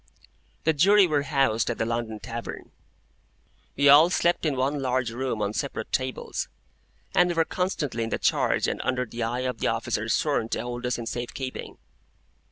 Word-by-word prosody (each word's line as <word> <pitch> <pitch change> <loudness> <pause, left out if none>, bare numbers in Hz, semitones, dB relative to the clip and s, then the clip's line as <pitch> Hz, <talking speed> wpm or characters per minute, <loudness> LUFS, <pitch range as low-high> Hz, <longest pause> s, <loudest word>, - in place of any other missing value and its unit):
The 160 - +3
Jury 195 +7 +6
were 150 -4 +1
housed 135 -7 +1
at 120 - -2
the - - 0
London 115 -2 -3
Tavern. 115 0 -7 1.0
We 140 +1 +3
all 145 +4 +8
slept 175 -2 +1
in 145 - 0
one 135 +2 0
large 130 -2 0
room 120 -3 -2
on 100 +1 -1
separate 140 +4 -4
tables, 130 -1 -2 0.6
and 180 0 +4
we 175 - -1
were 165 -1 +3
constantly 150 - -2
in - - -5
the - - -1
charge - - +1
and - - -2
under 125 0 0
the 120 +1 -7
eye 120 +2 -1
of 130 0 -3
the - - 0
officer - - -1
sworn 110 - +1
to - - -1
hold 120 0 -4
us 125 - -1
in 120 - -5
safe 120 +1 -5
keeping. 130 -1 -6
130 Hz, 185 wpm, -26 LUFS, 120-145 Hz, 1.0 s, all